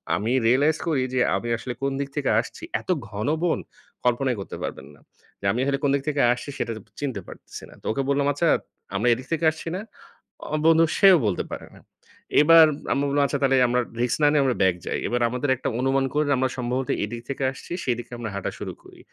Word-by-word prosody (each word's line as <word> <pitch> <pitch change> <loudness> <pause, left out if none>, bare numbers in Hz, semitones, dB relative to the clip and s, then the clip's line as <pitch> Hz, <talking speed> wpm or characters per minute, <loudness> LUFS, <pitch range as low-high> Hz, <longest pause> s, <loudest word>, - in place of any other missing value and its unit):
আমি 110 +4 -1 0.2
রিয়ালাইজ 145 +6 +3
করি 140 -5 +1
যে, 130 - +1 0.2
আমি 95 +5 -3
আসলে 125 +2 -5
কোন 140 - 0
দিক 140 0 -3
থেকে 145 -2 0
আসছি, 115 - -6 0.2
এত - - -24 0.2
ঘন 105 +1 -4 0.2
বন 175 - +1 0.5
কল্পনাই 125 +1 +2
করতে - - -7
পারবেন - - -5
না। - - -22 0.4
যে, - - -9
আমি 120 - -2
আসলে 140 0 0
কোন 140 - +3
দিক 140 - -2
থেকে 145 -1 0
আসছি 125 - -8
সেটা 115 - -2 0.3
চিনতে 130 -9 -3
পারতেছি - - -11
না। - - -14
তো - - -24
ওকে 125 - -1
বললাম 140 0 +2
"আচ্ছা 165 +4 0 0.5
আমরা 105 +5 +1
এদিক 130 +3 -6
থেকে 165 0 0
আসছি 160 - -10
না?" 190 - -3 0.7
অ - - +3
বন্ধু 165 0 +6
সেও 195 -2 +7
বলতে 100 -4 0
পারে - - -6
না। - - -15 0.6
এবার 165 +1 +8 0.3
আমরা 140 - 0
বললাম 145 +1 +2
আচ্ছা 140 - -2
তাহলে 135 0 +4
আমরা 125 +1 +2 0.2
রিস্ক 120 -1 +1
না - - +7
নিয়ে 145 -2 +3
আমরা 130 -2 +1
ব্যাক 95 -2 +4
যাই। - - -2
এবার 120 0 -1
আমাদের 125 +4 -2
একটা 130 - -3
অনুমান 135 +1 +2
করে 150 +1 +2
নি 145 - +3
আমরা 130 0 +1
সম্ভবত 125 +1 -2
এদিক 115 +3 -5
থেকে 135 0 -3
আসছি, 135 - -9
সেদিকে 120 -1 -2
আমরা 115 -2 -5
হাঁটা 100 - -3
শুরু - - -5
করি। - - -16
135 Hz, 225 wpm, -24 LUFS, 120-145 Hz, 0.7 s, এবার